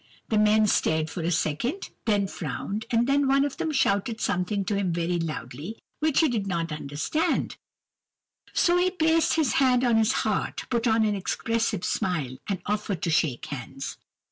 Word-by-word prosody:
The 215 - +2
men 215 0 +5
stared 160 -5 +1
for 175 - -4
a 165 - 0
second, 175 - -1
then 205 -3 +2
frowned, 205 +2 -4
and 230 0 +2
then 280 +1 +2
one 275 +1 +4
of 285 - -4
them 320 - -1
shouted 220 -4 +1
something 195 +1 -1
to 205 - -1
him 195 -3 0
very 170 +1 0
loudly, 155 - -5 0.2
which 310 -1 +3
he 320 - +4
did 220 -7 -1
not 170 -3 -2
understand; 150 - -1 1.0
so 350 0 +3
he 360 +1 +3
placed 325 -2 +2
his 305 -8 +2
hand 255 -1 +4
on 240 -3 +3
his 220 -1 +3
heart, - - -1
put 235 0 +1
on 220 -1 +3
an 210 - +1
expressive 225 +1 -1
smile, 150 -9 -1
and 195 -3 -2
offered 205 -4 -2
to 170 - +1
shake 155 -6 +1
hands. 135 0 -6
210 Hz, 175 wpm, -26 LUFS, 170-245 Hz, 1.0 s, men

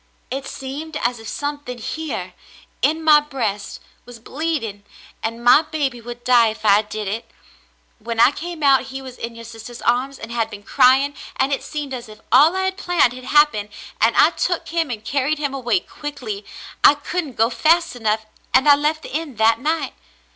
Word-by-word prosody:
It 270 +1 -4
seemed 295 +5 -6
as 240 -2 -1
if 225 - -10
something 290 -2 -4
here 230 - -5 0.5
in 310 +6 +1
my 305 -1 +7
breast 230 -9 -4 0.2
was 245 0 -12
bleeding, 235 -5 -4 0.4
and 230 +1 -4
my 250 +5 +8
baby 290 -6 -3
would 240 +1 -9
die 245 -2 +5
if 220 0 -5
I 205 0 +6
did 210 -1 -6
it. 220 +4 -4 0.7
When 230 +1 -5
I 250 - +7
came 330 +1 -7
out, 270 -2 +5
he 265 0 -7
was 260 -2 -9
in 230 0 -5
your 230 0 -10
sister's 230 +1 -10
arms 255 +3 +1
and 225 - -9
had 230 -2 -1
been 205 0 -10
crying, 265 +6 +4 0.2
and 270 +2 +1
it - - -1
seemed 295 -3 -5
as 240 -3 -7
if 215 0 -13
all 300 +7 +6
I 380 - 0
had 380 0 -1
planned 350 -10 +2
had 255 0 -10
happened, 295 -9 +3 0.3
and 225 +2 +4
I 315 - +6
took 355 0 -2
him 330 -2 0
and 220 -3 -6
carried 280 +3 0
him 285 -2 -2
away 240 -7 +1
quickly. 225 -3 -7 0.4
I 290 - +8
couldn't 295 0 -4
go 225 +2 +3
fast 335 +3 +2
enough, 220 -2 -1 0.3
and 265 +3 +5
I 290 - +9
left 300 +2 -1
the - - -9
inn 310 -5 -3
that 220 +1 +3
night. 315 +5 -1
260 Hz, 195 wpm, -21 LUFS, 230-295 Hz, 0.7 s, I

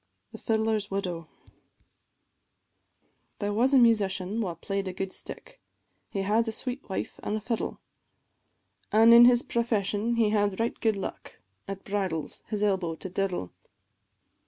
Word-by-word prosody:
THE - - -10
FIDDLER'S 220 -2 0
WIDOW. 180 -4 -3 2.1
There 205 0 -2
was 245 +5 +3
a 275 - +6
musician 210 -3 +2
wha 180 -6 -3
play'd 195 +3 -3
a 185 - -4
good 190 +1 -4
stick, - - -10 0.5
He 195 - -2
had 220 +4 +2
a - - 0
sweet 250 +3 -5
wife 190 - -4
an' 210 - -2
a - - -1
fiddle, 225 +1 -3 1.1
An' 225 +2 +7
in 235 +1 +10
his 245 0 +5
profession 225 -1 0
he 225 -2 +2
had 205 -2 +1
right 230 +1 -1
good 220 -2 +2
luck 195 - -7 0.3
At 195 0 -6
bridals 190 -6 -3
his 210 -2 -2
elbow 190 -5 0
to 190 - -7
diddle. 185 - -2
205 Hz, 145 wpm, -28 LUFS, 195-230 Hz, 2.1 s, in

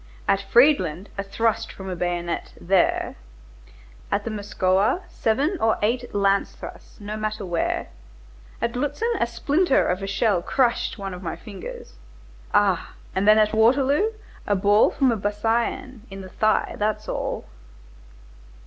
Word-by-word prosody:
At 195 0 +3
Friedland, 200 - +3
a 200 - -2
thrust 225 +3 -1
from 190 - -9
a 185 - -3
bayonet, 175 -1 -3
there,—at - - -3
the 230 - -4
Moskowa 200 - +1
seven 290 - 0
or 225 0 +2
eight 240 +1 -1
lance 200 0 +2
thrusts, - - -11
no 210 +1 -5
matter 215 -1 -3
where, 175 -2 -1 0.7
at 235 0 0
Lutzen 290 - -1
a 235 - +2
splinter 280 +7 +2
of 180 +2 -1
a 195 - -4
shell 195 -2 +1
crushed 240 +6 0
one 195 -2 -5
of 180 - -8
my 170 -3 -4
fingers. 475 - -10 0.5
Ah! 200 -4 +2 0.2
and 190 +2 0
then 215 0 +7
at 215 0 +3
Waterloo, 270 - +3 0.4
a 205 - +2
ball 205 +2 +4
from 265 -2 +2
a 230 - 0
biscaïen 225 +5 -1
in 195 0 -8
the 185 - -9
thigh, 215 +3 +1
that's 215 0 -1
all." - - -3
210 Hz, 145 wpm, -24 LUFS, 190-235 Hz, 0.7 s, then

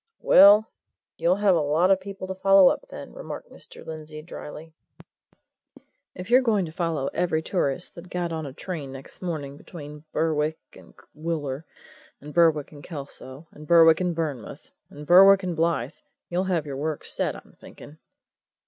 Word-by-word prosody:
"Well 205 +3 +7 0.5
you'll 170 +2 +3
have 200 -1 +3
a - - +2
lot 155 +6 +2
of 190 -1 +3
people 195 -1 -7
to 190 - -5
follow 195 0 +6
up, - - -3
then," - - -10
remarked - - -8
Mr. - - -11
Lindsey 155 -1 -8
drily. 160 -1 -10 1.4
"If 185 +5 -8
you're 255 +2 +7
going 215 -7 +1
to 160 - -8
follow 165 -5 -2
every 160 -3 0
tourist 175 -2 -2
that 175 +1 -12
got 175 -1 -3
on 160 -2 -4
a - - -7
train 150 -1 -7
next 135 0 -11
morning 150 -6 -5
between 150 -2 -11
Berwick 155 -1 0 0.2
and - - -17 0.2
Wooler, 155 -3 -4 0.5
and 150 +1 -11
Berwick 160 -4 +3
and 145 -2 -13
Kelso, 140 -2 -9
and 150 0 -13
Berwick 165 0 +6
and 180 -2 -1
Burnmouth, 150 -8 -5 0.2
and 150 +1 -11
Berwick 195 +3 +7
and 180 -2 -3
Blyth, 165 +1 -1 0.3
you'll 180 +2 -1
have 175 -5 -1
your 140 -2 -6
work 155 +1 -4
set, - - 0
I'm - - -15
thinking!" 150 +2 -14
165 Hz, 165 wpm, -25 LUFS, 150-185 Hz, 1.4 s, Well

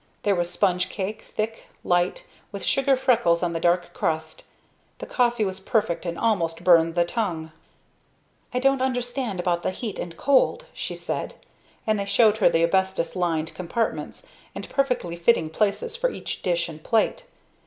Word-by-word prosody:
There 205 - +3
was 175 -2 -1
sponge 180 0 +1
cake, 205 +2 -4 0.2
thick, 220 +1 -3 0.2
light, 175 - +1 0.3
with - - -6
sugar 270 0 +3
freckles 235 -10 +3
on 170 -1 0
the 165 - -2
dark 175 +1 +1
crust. 160 0 -2 0.6
The - - -7
coffee 240 -3 +1
was 190 -1 -4
perfect 190 -3 0
and 170 0 -3
almost 175 -7 0
burned 165 -2 +5
the 175 -1 +3
tongue. 170 -6 -3 1.0
"I - - -2
don't 270 +1 +2
understand 245 -5 -2
about 175 -1 0
the - - -1
heat 210 +3 -5
and 165 -1 -6
cold," 275 -1 +2
she - - -5
said; - - -4 0.5
and 215 -1 +1
they 200 - -2
showed 220 +1 +4
her 215 - +5
the 165 - +2
asbestos 190 -1 +1
lined 165 -3 -1
compartments 220 - -3 0.3
and - - -6
perfectly 250 -11 0
fitting 170 -3 +2
places 215 - 0
for - - +1
each - - -5
dish 175 -2 0
and 155 -2 -10
plate. 225 -2 +1
190 Hz, 165 wpm, -25 LUFS, 170-235 Hz, 1.0 s, burned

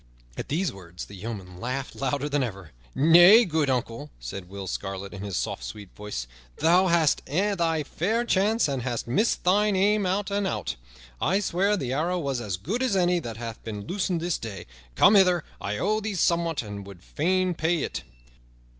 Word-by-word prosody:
At - - -5
these 165 +1 0
words 90 -2 -9
the - - -14
yeomen 95 -3 -7
laughed 130 +4 -4
louder 140 +1 -1
than 145 -1 0
ever. 100 - -5 0.2
"Nay, 175 - +8
good 160 -5 0
uncle," 115 - -2
said 90 +10 -7
Will 100 0 -7
Scarlet 95 +1 -5
in 95 - -7
his 100 -3 -3
soft, - - -3
sweet 95 +10 -8
voice, 105 -13 -5 0.3
"thou 180 +3 +4
hast 165 -4 +3
had 195 +6 0
thy 165 -2 +1
fair 220 +11 -1
chance 215 0 +2
and 135 -3 -2
hast 120 -2 -3
missed 210 - +1
thine 205 +3 +3
aim 200 +1 +2
out 200 +2 -1
and 200 -1 0
out. - - -3 0.5
I 190 +5 +2
swear 200 +1 +1
the 130 -6 -3
arrow 170 +6 0
was 140 -7 -2
as 100 -5 -3
good 195 - -3
as 255 -6 +1
any 180 -1 +3
that 115 -8 -7
hath 115 -1 -7
been 105 -3 -6
loosed 185 -1 -1
this 170 0 -1
day. 100 -6 -7 0.3
Come 200 - +6
hither; 180 -5 +5 0.2
I 105 +1 -2
owe 215 - +1
thee 215 -1 -3
somewhat, 170 -4 +1
and 105 -1 -7
would 95 -3 -12
fain 185 +3 0
pay 165 -1 0
it." - - -4
155 Hz, 190 wpm, -26 LUFS, -, 0.5 s, Nay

